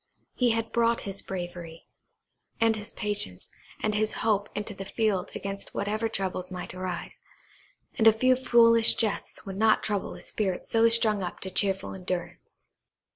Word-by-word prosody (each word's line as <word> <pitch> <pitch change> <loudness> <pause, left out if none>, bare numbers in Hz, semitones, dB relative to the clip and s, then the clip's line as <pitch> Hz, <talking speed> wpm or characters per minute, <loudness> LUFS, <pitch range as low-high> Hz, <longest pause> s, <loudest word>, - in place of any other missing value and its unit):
He 250 -2 +2
had 225 0 -1
brought 235 0 +2
his 200 0 0
bravery, 175 -3 -7 0.7
and 225 -1 +3
his 210 0 -5
patience, 205 - -1 0.3
and 215 - +1
his 215 +1 +1
hope 205 -2 +1
into 210 +1 -4
the 195 - -7
field 200 -2 -1
against 195 0 -6
whatever 215 +3 -1
troubles 185 -3 -3
might 180 -1 -7
arise, 185 -1 -6 0.7
and 225 -3 +3
a - - +10
few 255 +4 +3
foolish 230 -2 +5
jests 220 -1 -2
would 195 -1 -6
not 220 +1 +3
trouble 205 -2 -2
a - - -11
spirit 190 -4 -2
so 225 0 +4
strung 220 -3 +3
up 180 - -5
to 190 - -5
cheerful 195 -1 +1
endurance. 180 -2 -6
210 Hz, 160 wpm, -27 LUFS, 190-225 Hz, 0.7 s, a